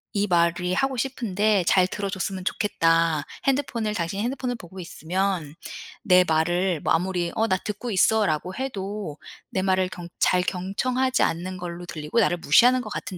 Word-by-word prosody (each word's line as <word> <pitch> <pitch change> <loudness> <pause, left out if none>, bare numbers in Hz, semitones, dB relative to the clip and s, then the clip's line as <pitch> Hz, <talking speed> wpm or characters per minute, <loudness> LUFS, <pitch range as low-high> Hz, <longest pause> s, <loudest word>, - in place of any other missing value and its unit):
이 200 +1 +1
말이 175 0 +1
하고 270 +2 0
싶은데 215 -6 0
잘 185 -1 +4
들어 200 +1 -4
줬으면 190 -1 -4
좋겠다. 165 -7 +1 0.2
핸드폰을 245 -6 0
당신이 175 +3 -2
핸드폰을 250 +1 -2
보고 185 -1 -11
있으면 175 -2 -2 0.5
내 185 -2 +6
말을 175 +1 +1
뭐 - - +1
아무리 175 0 0
'어 225 - +1
나 185 - +2
듣고 210 +5 -5
있어.'라고 190 -4 +2
해도 205 - -5 0.3
내 190 - -1
말을 185 -1 +1
경 175 -2 -8
잘 180 - +3
경청하지 250 +9 -1
않는 185 +3 -2
걸로 175 0 -6
들리고 155 +5 -2
나를 180 -5 +2
무시하는 245 - +5
것 215 - -7
같은 185 - -5
185 Hz, 340 characters per minute, -24 LUFS, 175-215 Hz, 0.5 s, 내